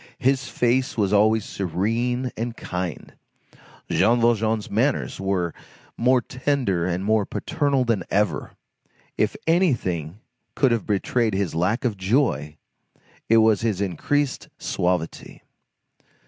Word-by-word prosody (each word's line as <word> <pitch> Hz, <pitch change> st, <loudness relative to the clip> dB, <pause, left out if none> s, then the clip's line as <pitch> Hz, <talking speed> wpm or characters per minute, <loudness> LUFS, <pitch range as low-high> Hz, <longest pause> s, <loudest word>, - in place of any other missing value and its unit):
His 130 Hz, 0 st, +1 dB
face 130 Hz, +4 st, +1 dB
was 100 Hz, -2 st, +1 dB
always 110 Hz, +1 st, +3 dB
serene 115 Hz, +7 st, -1 dB
and 115 Hz, +1 st, -4 dB
kind. 90 Hz, -2 st, -5 dB, 0.7 s
Jean 115 Hz, +5 st, +3 dB
Valjean's 115 Hz, -2 st, +1 dB
manners 125 Hz, +6 st, 0 dB
were 95 Hz, -3 st, -1 dB, 0.4 s
more 125 Hz, +1 st, +3 dB
tender 125 Hz, -10 st, -1 dB
and 90 Hz, +2 st, -2 dB
more 110 Hz, 0 st, +3 dB
paternal 140 Hz, -, 0 dB
than 115 Hz, -5 st, +1 dB
ever. 100 Hz, -6 st, 0 dB, 0.6 s
If -, -, 0 dB
anything 110 Hz, -, +1 dB, 0.4 s
could 135 Hz, -3 st, +3 dB
have 115 Hz, -2 st, -1 dB
betrayed 110 Hz, +1 st, 0 dB
his 95 Hz, -4 st, -1 dB
lack 95 Hz, +10 st, 0 dB
of 110 Hz, -5 st, 0 dB
joy, 95 Hz, -, 0 dB, 0.7 s
it 115 Hz, -, +6 dB
was 110 Hz, -2 st, +4 dB
his 110 Hz, -5 st, 0 dB
increased 130 Hz, -, -1 dB
suavity. 90 Hz, -2 st, -2 dB
110 Hz, 120 wpm, -23 LUFS, 95-125 Hz, 0.7 s, it